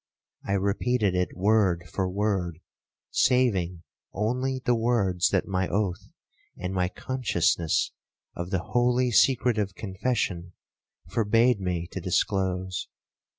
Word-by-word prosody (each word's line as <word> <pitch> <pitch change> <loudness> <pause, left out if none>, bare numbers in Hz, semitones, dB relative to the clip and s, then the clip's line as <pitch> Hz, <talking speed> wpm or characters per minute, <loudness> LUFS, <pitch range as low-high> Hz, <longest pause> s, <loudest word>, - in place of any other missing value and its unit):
I 100 - -2
repeated 100 +2 +1
it 90 -1 -1
word 95 -3 +2
for 95 +2 -2
word, 95 -4 -1 0.5
saving 95 -10 +2 0.3
only 125 +5 -1
the 120 - +4
words 110 -7 +2
that 95 - +1
my 95 -2 0
oath, 100 -3 -2 0.5
and 90 +1 -4
my 90 -1 +1
consciousness 90 - 0 0.4
of 85 +1 -5
the 95 -3 -1
holy 125 +2 +2
secret 125 -1 +3
of 100 -2 -2
confession, 95 -4 -2 0.5
forbade 115 +1 +3
me 90 -3 -2
to 95 - -5
disclose. 95 0 -1
100 Hz, 115 wpm, -26 LUFS, 90-115 Hz, 0.5 s, the